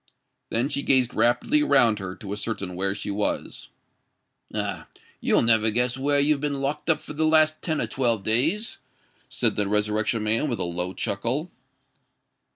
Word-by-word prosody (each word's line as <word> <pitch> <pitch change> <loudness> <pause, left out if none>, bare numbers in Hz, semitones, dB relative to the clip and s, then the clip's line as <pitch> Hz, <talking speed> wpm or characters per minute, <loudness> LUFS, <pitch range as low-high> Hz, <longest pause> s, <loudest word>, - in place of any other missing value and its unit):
Then 120 +4 0
she 140 - -2
gazed 130 -3 +3
rapidly 120 - +2
around 120 - +3
her, 95 -1 -6
to 100 -1 -7
ascertain 105 -4 -4
where 95 +2 -1
she 100 - -4
was. 105 +1 -3 0.8
"Ah! - - -4 0.3
you'll - - +2
never 110 -1 +3
guess 125 +3 0
where 140 +2 +1
you've 145 0 +2
been 145 -2 -2
locked 145 +4 -3
up 155 -2 +3
for - - -9
the 155 +2 -1
last 155 0 +4
ten 160 -3 -1
or - - 0
twelve 115 -6 0
days," 150 - 0 0.5
said - - 0
the 105 -1 0
Resurrection 105 +2 0
Man, 115 +7 +1
with 120 - -1
a - - 0
low 90 +2 -2
chuckle. 125 - -2
120 Hz, 165 wpm, -25 LUFS, 105-145 Hz, 0.8 s, last